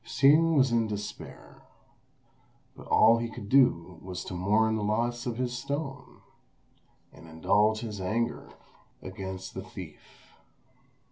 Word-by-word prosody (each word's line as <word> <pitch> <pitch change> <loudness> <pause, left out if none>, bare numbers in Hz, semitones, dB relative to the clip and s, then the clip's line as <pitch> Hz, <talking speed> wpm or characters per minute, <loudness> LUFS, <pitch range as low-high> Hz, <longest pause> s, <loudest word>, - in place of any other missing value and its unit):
Hsing 150 +5 +4
was 135 -3 +4
in 115 -1 +2
despair; 105 -1 -8 1.1
but - - -13
all 115 +1 +5
he 115 0 -3
could 110 -3 -9
do 95 -10 +3
was 90 -1 -6
to - - -7
mourn 105 +5 +2
the 110 - -2
loss 120 +4 -1
of 115 -2 -3
his 125 -1 -2
stone, 140 +2 -6 0.9
and 80 - -15
indulge 105 +7 +1
his 105 -4 -6
anger 115 +6 -2 0.5
against 95 0 -7
the - - -5
thief. - - -13
110 Hz, 130 wpm, -28 LUFS, 95-125 Hz, 1.1 s, all